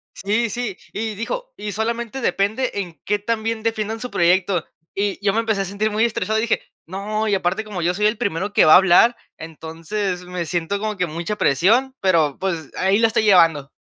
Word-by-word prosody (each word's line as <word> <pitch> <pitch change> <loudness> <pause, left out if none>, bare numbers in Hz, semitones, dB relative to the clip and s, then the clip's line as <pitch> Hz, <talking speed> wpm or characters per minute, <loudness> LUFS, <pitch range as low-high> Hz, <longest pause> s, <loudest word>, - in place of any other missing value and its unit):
Sí, 215 +4 0
sí. 225 -4 -4 0.2
Y 220 0 -3
dijo: - - -5
"Y 210 0 -5
solamente 235 +4 -3
depende 220 +5 0
en 180 -5 -5
qué 205 0 0
tan 225 +1 -2
bien 225 -1 -2
defiendan 225 -1 -2
su 250 - -5
proyecto". 175 0 +2 0.3
Y 200 0 -1
yo 195 - +3
me 225 - +1
empecé 220 -3 0
a - - -2
sentir 200 +3 -1
muy 215 +2 +1
estresado 220 -1 -1
y - - +1
dije: 235 - 0 0.2
"No". 210 +5 -3
Y, 205 - +1
aparte 190 +4 -1
como 200 -5 -6
yo 175 +2 +1
soy 210 +1 0
el 215 +1 +2
primero 200 +2 -2
que - - +5
va 155 - +7
a - - +10
hablar, 195 +6 +5 0.2
entonces 165 +4 -5
me 180 -1 -4
siento 175 +4 -2
como 215 -1 -3
que 180 -1 0
mucha 170 +7 -4
presión, 225 - +2
pero 165 -7 +2
pues 170 -6 -3
ahí 195 +3 +2
la 225 - +5
estoy 225 -1 0
llevando. 165 -8 +4
205 Hz, 215 wpm, -21 LUFS, 180-220 Hz, 0.3 s, a